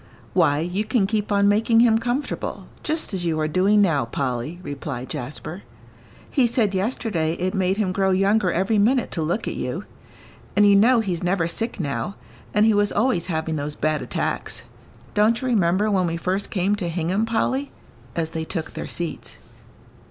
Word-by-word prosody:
"Why, 145 0 +3
you 180 +5 -1
can 220 -2 +1
keep 210 +1 -1
on 200 0 +4
making 225 +3 +4
him 225 -2 +5
comfortable, 245 +5 -3 0.2
just 315 -6 -2
as 185 -2 -2
you 160 -2 0
are 155 - +1
doing 195 +6 +3
now, 160 -7 +2
Polly," 125 +5 -3
replied 135 -3 -5
Jasper. 150 +8 -5 0.7
"He 260 -5 +3
said 225 -4 +1
yesterday 190 -5 -1
it 185 +3 -2
made 190 -1 +1
him 205 -4 0
grow 190 +1 +1
younger 195 0 +3
every 195 +5 +1
minute 245 +5 +2
to 165 - -2
look 170 +8 -1
at - - -2
you. - - -4 0.7
And 205 - +5
you 200 -1 +6
know 230 +4 +5
he's 180 -6 -2
never 180 -1 +1
sick 225 +6 -3
now, 170 +5 -3 0.4
and 210 +1 +4
he 220 - +5
was 205 0 +2
always 205 -6 +1
having 160 -2 -2
those 145 +1 -3
bad 155 -1 0
attacks. 125 - -2 0.5
Don't 215 +3 +3
you 260 - -3
remember 205 -1 +2
when 185 -3 +2
we 165 0 -2
first 185 +4 -2
came 195 +1 +1
to 180 -4 -2
Hingham, 180 +6 0
Polly?" 260 +5 0 0.4
as 160 -1 -2
they 160 -1 -3
took 160 -1 -4
their - - -5
seats. 170 -3 -5
190 Hz, 180 wpm, -23 LUFS, 165-215 Hz, 0.7 s, you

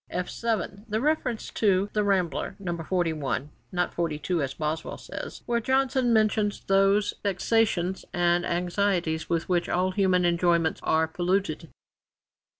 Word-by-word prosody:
[F 180 0 -3
7] 215 -3 -2
The 215 +1 0
reference 260 -4 0
is - - -7
to 200 -2 +2
The 210 - +1
Rambler, 195 -1 0
No. 180 -4 -3
41 160 -5 -2 0.2
(not 180 0 -1
42 165 0 -1
as 135 -1 -3
Boswell 155 +1 -3
says), - - -8
where 235 0 +1
Johnson 260 0 +1
mentions 215 -2 +2
'those 195 +1 +3
vexations 195 -2 +1
and 175 -1 +2
anxieties 175 -2 0
with 165 -1 0
which 175 -2 0
all 185 +1 +1
human 185 -2 +2
enjoyments 170 -2 +2
are 160 0 +2
polluted.' 175 -1 -1
180 Hz, 140 wpm, -27 LUFS, 170-205 Hz, 0.2 s, those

